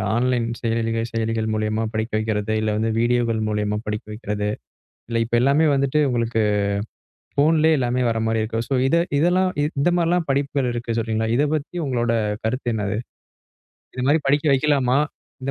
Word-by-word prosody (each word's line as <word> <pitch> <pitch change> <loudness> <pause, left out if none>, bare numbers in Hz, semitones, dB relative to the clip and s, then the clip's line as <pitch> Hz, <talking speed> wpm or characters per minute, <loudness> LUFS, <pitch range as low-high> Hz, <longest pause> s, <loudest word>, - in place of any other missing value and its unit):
Online 120 -1 +1
செயலிக 115 0 0
செயலிகள் 115 -1 -1
மூலியமா 110 +1 -1
படிக்க 110 +1 -2
வைக்கிறது, 110 0 -1
இல்ல 110 -1 0
வந்து 110 +1 0
வீடியோகள் 120 -1 +1
மூலமா 105 0 -1
படிக்க 105 0 -3
வைக்கிறது. 105 -1 -3 0.6
இல்ல 115 -1 0
இப்ப 120 - -1
எல்லாமே 140 +5 +4
வந்துட்டு 140 +2 +1
உங்களுக்கு 115 -2 0 1.0
போன்லே 160 +2 +4
எல்லாமே 125 0 0
வர்ற 115 0 -1
மாதிரி 110 0 +1
இருக்கு. 115 +1 -3
சோ, 140 - 0
இத 155 - +2 0.2
இதெல்லாம் 180 +3 +3 0.3
இந்த 175 - +3
மாதிரி 170 -1 +1
எல்லாம் 175 -2 +1
படிப்புகள் 140 -1 0
இருக்கு 120 -1 -3
சொல்றீங்களா? 110 0 -1
இதைப் 150 +1 +1
பத்தி 150 +3 -5
உங்களோட 120 -2 0 0.3
கருத்து 120 0 -1
என்னது? 105 0 -2 1.0
இது 125 - -2
மாதிரி 150 +2 +3
படிக்க 145 +2 +2
வைக்கலாமா? 135 -2 +2 0.4
இந்த 135 - -2
120 Hz, 160 wpm, -22 LUFS, 110-140 Hz, 1.0 s, எல்லாமே